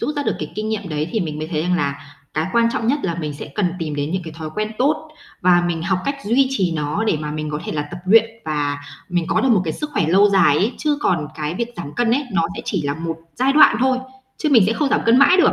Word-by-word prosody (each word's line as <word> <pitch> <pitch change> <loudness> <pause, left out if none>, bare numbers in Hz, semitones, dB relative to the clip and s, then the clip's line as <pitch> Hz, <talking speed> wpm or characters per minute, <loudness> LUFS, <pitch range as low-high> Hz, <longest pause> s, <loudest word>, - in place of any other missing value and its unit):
rút 300 - -2
ra 290 - 0
được - - -1
cái - - -6
kinh 215 +1 -3
nghiệm 215 -3 -3
đấy, 155 0 -2
thì 220 - 0
mình 155 -4 -3
mới 155 - -3
thấy 155 -2 -1
rằng 180 +1 +1
là 140 -2 -3 0.2
cái 155 +1 0
quan 235 0 +4
trọng 225 - -2
nhất 275 +5 +2
là 170 -3 -1
mình 155 -3 -4
sẽ - - -8
cần 180 -4 0
tìm 155 -4 -3
đến 145 +1 -2
những 185 +1 -2
cái 160 - -8
thói 160 -1 -6
quen 215 +1 -2
tốt 290 +4 +1 0.3
và 175 -1 +4
mình 165 -2 -2
học 190 +1 0
cách 280 0 -1
duy 250 +6 +3
trì 190 -10 0
nó 150 +8 -1
để 215 - +1
mà 150 0 -4
mình 155 0 -4
có 150 0 -3
thể - - -4
là 150 - -1
tập 175 - -7
luyện 225 +3 +5
và 145 -2 -2 0.3
mình 175 -2 0
có - - +2
được 265 - +2
một 220 -6 +4
cái 160 - -2
sức 300 - -5
khỏe 170 - +1
lâu 195 +4 +5
dài 180 -7 +4
ấy. 210 +9 +1
Chứ 295 -1 0
còn 165 - 0
cái 150 +1 -3
việc 235 +5 -2
giảm 145 - -7
cân 240 -1 +1
ấy, 275 +5 +1
nó 170 -3 +2
sẽ 235 - -5
chỉ 190 -7 -1
là 145 0 -1
một 165 +1 -4 0.2
giai 265 +2 +2
đoạn 295 -6 +7
thôi, 260 0 +2 0.4
chứ 310 - -1
mình 230 - +7
sẽ 225 - +2
không 290 +4 0
giảm - - +2
cân 230 +2 +6
mãi 360 +6 +6
được. 370 - +5
180 Hz, 300 wpm, -20 LUFS, 155-235 Hz, 0.4 s, đoạn